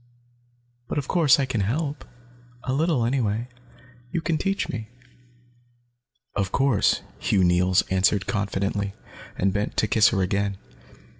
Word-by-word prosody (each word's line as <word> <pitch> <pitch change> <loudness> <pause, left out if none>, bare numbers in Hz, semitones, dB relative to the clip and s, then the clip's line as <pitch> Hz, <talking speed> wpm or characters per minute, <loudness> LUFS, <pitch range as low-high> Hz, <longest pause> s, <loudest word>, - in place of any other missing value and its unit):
"But - - -3
of 140 -2 -2
course, 160 -3 +4
I 135 - +2
can 125 -5 -1
help, 140 +9 -2 0.6
a 130 - -2
little 150 -4 +1
anyway. 120 -2 -1 0.6
You - - 0
can 160 -1 -1
teach 195 +3 -1
me." 110 -2 -5 1.5
"Of 100 -2 -1
course," 135 -4 +2 0.2
Hugh 95 - +2
Neils 90 +1 +3
answered 95 +1 +2
confidently, 100 0 -2 0.4
and 95 0 +1
bent 105 +1 -2
to 110 - +2
kiss 110 -1 +5
her 95 -4 0
again. 100 +1 -1
105 Hz, 135 wpm, -24 LUFS, 100-140 Hz, 1.5 s, kiss